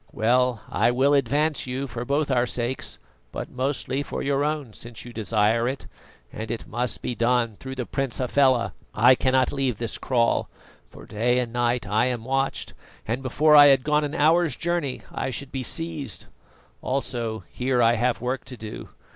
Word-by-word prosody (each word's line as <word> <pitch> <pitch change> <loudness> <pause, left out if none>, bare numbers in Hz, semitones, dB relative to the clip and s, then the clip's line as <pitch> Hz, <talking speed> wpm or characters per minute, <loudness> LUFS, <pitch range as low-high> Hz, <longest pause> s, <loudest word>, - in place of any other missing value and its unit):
Well, 120 0 +1
I - - +2
will 130 +4 +3
advance 145 +2 +1
you, 130 +2 -3
for 120 -2 -6
both 140 +1 0
our 125 -1 +2
sakes, 120 +2 -3 0.3
but - - -6
mostly 135 +1 -1
for - - -4
your 140 0 +1
own, 150 -6 -2
since 120 +1 -10
you 120 - -10
desire 110 +1 +1
it, 130 +1 -4 0.5
and 110 0 -6
it 115 - -4
must 120 +2 -3
be - - -2
done 120 -1 +1
through 130 0 -7
the 125 -2 -3
Prince 135 -1 -2
Hafela. 130 -1 +2 0.2
I 120 +5 +7
cannot 130 0 +2
leave 135 -5 -1
this 115 -1 -3
kraal, 120 -3 +1 0.4
for - - -13
day 120 +4 0
and 120 -2 -1
night 120 -2 0
I 105 +4 +2
am 120 -3 -3
watched, 135 +1 -1 0.3
and 115 +4 -1
before 150 +4 +3
I 145 -1 +10
had 135 -2 +5
gone 150 +1 +2
an 145 +2 -3
hour's 160 -1 +3
journey 170 -6 -2
I - - -3
should 130 +2 -5
be 135 - -3
seized; 155 - -4 0.6
also 120 -4 -2
here 125 0 0
I 115 -1 +5
have 120 +1 0
work 125 +2 -2
to 125 - -8
do. 110 -1 -8
125 Hz, 180 wpm, -25 LUFS, 120-140 Hz, 0.6 s, I